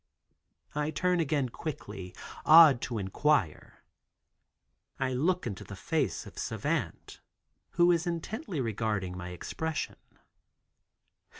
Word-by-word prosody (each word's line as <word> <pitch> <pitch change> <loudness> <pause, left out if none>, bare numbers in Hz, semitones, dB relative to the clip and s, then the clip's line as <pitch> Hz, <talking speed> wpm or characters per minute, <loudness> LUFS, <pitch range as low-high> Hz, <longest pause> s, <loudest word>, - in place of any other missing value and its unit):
I 150 0 -1
turn 180 +2 +1
again 145 -5 +1
quickly, 105 - -7 0.3
awed 155 -6 +8
to 120 - -3
inquire. 100 - 0 1.2
I 130 -1 0
look 175 +8 +1
into 100 -5 -5
the 100 - -9
face 90 - -1
of - - -10
Savant, - - -3 0.5
who 175 0 +5
is 170 0 +1
intently 175 - -3
regarding 110 -6 -2
my 90 0 -6
expression. 155 - -4
140 Hz, 105 wpm, -30 LUFS, 100-165 Hz, 1.2 s, awed